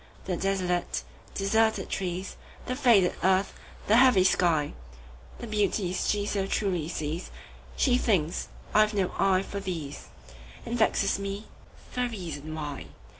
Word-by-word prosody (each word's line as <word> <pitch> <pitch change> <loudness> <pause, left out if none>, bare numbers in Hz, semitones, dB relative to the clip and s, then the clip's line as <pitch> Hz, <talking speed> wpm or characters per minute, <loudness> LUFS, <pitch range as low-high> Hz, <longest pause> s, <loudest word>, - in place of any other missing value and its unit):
The 185 - -1
desolate, 180 -1 -1 0.3
deserted 220 0 +2
trees, 185 0 -3 0.3
The 255 - -2
faded 235 -9 +4
earth, 190 +1 +2 0.3
the 220 - +5
heavy 250 -7 +6
sky, 170 -5 +2 0.6
The - - -7
beauties 205 -4 0
she 205 -1 +1
so 200 -2 -1
truly 185 -7 -1
sees, 160 0 -4 0.5
She 250 -2 +3
thinks 180 -9 0 0.3
I 215 - +6
have 215 0 +2
no 190 -3 +1
eye 190 -1 +3
for 200 - -5
these, 165 -7 -5 0.6
And 235 - -3
vexes 200 -4 +2
me 200 +2 -4 0.5
for 250 0 0
reason 160 -8 -6
why. 145 -3 -5
195 Hz, 135 wpm, -28 LUFS, 175-210 Hz, 0.6 s, heavy